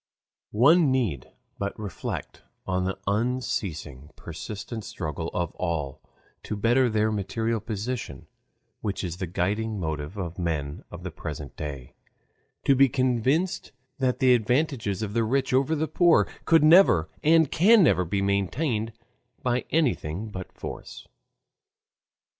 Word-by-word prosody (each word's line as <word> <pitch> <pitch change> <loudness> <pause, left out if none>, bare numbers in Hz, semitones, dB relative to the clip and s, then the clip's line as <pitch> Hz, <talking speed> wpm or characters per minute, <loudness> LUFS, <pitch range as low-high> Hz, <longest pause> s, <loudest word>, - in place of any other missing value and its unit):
One 150 +7 +6
need 110 - -1 0.3
but 100 0 -3
reflect 100 -7 -5 0.2
on 90 -1 0
the 95 +1 -2
unceasing, 100 - -2
persistent 100 +6 -7
struggle 80 -1 -4
of 85 -2 -2
all 80 -7 -3 0.4
to - - -4
better 120 +5 +3
their 110 0 +1
material 110 +3 -1
position, 110 - -5 0.5
which 100 -2 -3
is 90 -2 -4
the 95 - -3
guiding 100 +5 -1
motive 80 +2 -4
of 90 -2 -5
men 75 -3 -3
of 85 0 -10
the 95 - -5
present 75 -4 -7
day, 70 -5 -7 0.7
to 135 - +5
be 135 +1 +5
convinced 130 +8 0 0.3
that 130 -2 +1
the 130 -1 +5
advantages 120 - 0
of 105 -1 -4
the 115 0 +2
rich 130 +4 0
over 135 +5 +2
the 160 +1 -1
poor 170 +3 +4 0.2
could 165 -2 +5
never 155 - +6 0.2
and 160 -1 +4
can 205 +4 +6
never 90 - +4
be 100 +3 -1
maintained 110 - 0 0.5
by 125 0 0
anything 110 - 0
but 95 -2 -7
force. - - -8
105 Hz, 135 wpm, -26 LUFS, 90-130 Hz, 0.7 s, One